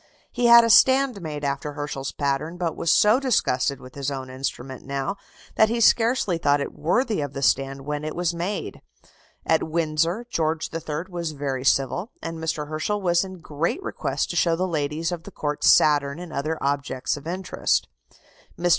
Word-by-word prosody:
He 245 Hz, -, +1 dB
had 235 Hz, 0 st, +9 dB
a 230 Hz, -, +1 dB
stand 260 Hz, -5 st, +5 dB
made 150 Hz, -3 st, -5 dB
after 140 Hz, +1 st, -2 dB
Herschel's 145 Hz, -2 st, -4 dB
pattern, 145 Hz, +4 st, -2 dB
but 175 Hz, -2 st, -2 dB
was 165 Hz, -, +1 dB
so 215 Hz, +4 st, +5 dB
disgusted 140 Hz, -, +1 dB
with 130 Hz, 0 st, -13 dB
his 140 Hz, -1 st, -3 dB
own 130 Hz, -2 st, -5 dB
instrument 130 Hz, 0 st, -5 dB
now 140 Hz, +7 st, -3 dB, 0.4 s
that 220 Hz, -, +5 dB
he 235 Hz, +1 st, -1 dB
scarcely 225 Hz, -6 st, +3 dB
thought 145 Hz, -2 st, +3 dB
it 140 Hz, -, -4 dB
worthy 200 Hz, -, 0 dB
of 145 Hz, -1 st, -4 dB
the 140 Hz, -, -4 dB
stand 135 Hz, +1 st, +1 dB
when 150 Hz, 0 st, -3 dB
it 155 Hz, -, -4 dB
was 175 Hz, -1 st, 0 dB
made. 175 Hz, +5 st, -4 dB, 0.6 s
At 160 Hz, -, +3 dB
Windsor, 165 Hz, +6 st, 0 dB
George 160 Hz, -7 st, -1 dB
III. 160 Hz, -1 st, -3 dB
was 170 Hz, -3 st, -4 dB
very 135 Hz, -3 st, -3 dB
civil, 135 Hz, -, +1 dB
and 165 Hz, 0 st, -6 dB
Mr. 155 Hz, -2 st, -3 dB
Herschel 155 Hz, +7 st, -2 dB
was 175 Hz, -2 st, +2 dB
in 185 Hz, -2 st, -9 dB
great 160 Hz, -, -2 dB
request -, -, -2 dB
to -, -, -6 dB
show 170 Hz, -1 st, +3 dB
the 185 Hz, +3 st, -1 dB
ladies 155 Hz, 0 st, -2 dB
of 175 Hz, -2 st, -4 dB
the -, -, -11 dB
Court 145 Hz, -1 st, -4 dB
Saturn 145 Hz, -1 st, +4 dB
and 175 Hz, -1 st, -8 dB
other 155 Hz, +3 st, -2 dB
objects 140 Hz, -2 st, -1 dB
of 145 Hz, +1 st, -9 dB
interest. 185 Hz, +1 st, -1 dB, 0.7 s
Mr. 175 Hz, +1 st, 0 dB
160 Hz, 185 wpm, -24 LUFS, 140-180 Hz, 0.7 s, had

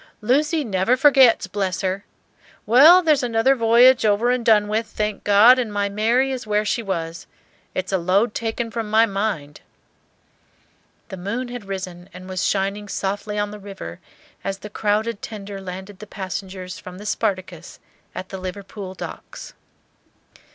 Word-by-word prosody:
"Lucy 295 Hz, +7 st, +1 dB
never 210 Hz, +2 st, +1 dB
forgets, 265 Hz, -5 st, +5 dB
bless 190 Hz, -1 st, -2 dB
her! 190 Hz, +1 st, -2 dB, 0.6 s
Well, 310 Hz, +11 st, +7 dB
there's 305 Hz, -4 st, +3 dB
another 240 Hz, +2 st, +2 dB
voyage 240 Hz, +1 st, +5 dB
over 215 Hz, +3 st, +2 dB
and 250 Hz, -1 st, 0 dB
done 215 Hz, -2 st, +4 dB
with, 220 Hz, +2 st, -1 dB
thank 210 Hz, -1 st, -3 dB
God, 215 Hz, +5 st, +6 dB
and 235 Hz, -4 st, -2 dB
my 205 Hz, 0 st, -1 dB
Mary 230 Hz, +6 st, +1 dB
is 255 Hz, -4 st, -5 dB
where 210 Hz, 0 st, +1 dB
she 230 Hz, -, 0 dB
was. 170 Hz, -5 st, -4 dB, 0.5 s
It's 185 Hz, +1 st, -3 dB
a 190 Hz, -, +1 dB
load 195 Hz, +6 st, +1 dB
taken 230 Hz, 0 st, -3 dB
from 225 Hz, -2 st, -4 dB
my 220 Hz, +2 st, +5 dB
mind." 195 Hz, -8 st, -3 dB, 1.5 s
The 190 Hz, -, -7 dB
moon 230 Hz, +8 st, -4 dB
had 245 Hz, -4 st, -7 dB
risen 185 Hz, -2 st, -7 dB
and 185 Hz, 0 st, -10 dB
was 185 Hz, -1 st, -3 dB
shining 200 Hz, +1 st, -1 dB
softly 205 Hz, +2 st, -3 dB
on 205 Hz, 0 st, -1 dB
the 210 Hz, -, -9 dB
river 195 Hz, -, -9 dB, 0.4 s
as 195 Hz, 0 st, -3 dB
the 210 Hz, +1 st, -10 dB
crowded 210 Hz, +1 st, -1 dB
tender 200 Hz, -2 st, -7 dB
landed 190 Hz, +1 st, -8 dB
the 215 Hz, -, -10 dB
passengers 190 Hz, -1 st, -6 dB
from 180 Hz, 0 st, -10 dB
the 205 Hz, -, -10 dB
"Spartacus" 185 Hz, -5 st, -3 dB, 0.4 s
at 185 Hz, +1 st, -6 dB
the 190 Hz, -, -6 dB
Liverpool 190 Hz, +1 st, -7 dB
docks. -, -, -9 dB
205 Hz, 160 wpm, -22 LUFS, 190-230 Hz, 1.5 s, Well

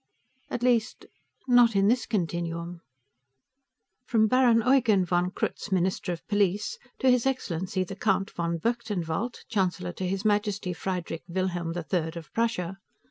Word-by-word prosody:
_ -, -, -39 dB
At 245 Hz, -, -3 dB
least, 235 Hz, -3 st, +1 dB, 0.4 s
not 245 Hz, -3 st, +5 dB
in 195 Hz, 0 st, +4 dB
this 240 Hz, +3 st, +2 dB
continuum.... 170 Hz, -3 st, -2 dB, 1.3 s
(From 220 Hz, -2 st, +4 dB
Baron 235 Hz, -1 st, +4 dB
Eugen 235 Hz, -8 st, +4 dB
von 175 Hz, +1 st, +1 dB
Krutz, 195 Hz, -, -4 dB
Minister 185 Hz, 0 st, 0 dB
of 170 Hz, -, -6 dB
Police, 205 Hz, -, 0 dB, 0.2 s
to 260 Hz, -2 st, +4 dB
His 250 Hz, +1 st, +2 dB
Excellency 185 Hz, -8 st, -1 dB
the 190 Hz, +1 st, -7 dB
Count 195 Hz, -1 st, 0 dB
von 170 Hz, 0 st, -2 dB
Berchtenwald, 220 Hz, 0 st, -2 dB
Chancellor 180 Hz, -4 st, -1 dB
to 185 Hz, -, -3 dB
His 195 Hz, +3 st, -2 dB
Majesty 205 Hz, -3 st, +1 dB
Friedrich 180 Hz, -2 st, -4 dB
Wilhelm 175 Hz, -2 st, -2 dB
III 165 Hz, -1 st, -1 dB
of 165 Hz, -2 st, -9 dB
Prussia.) 195 Hz, -5 st, -1 dB
190 Hz, 140 wpm, -27 LUFS, 175-230 Hz, 1.3 s, not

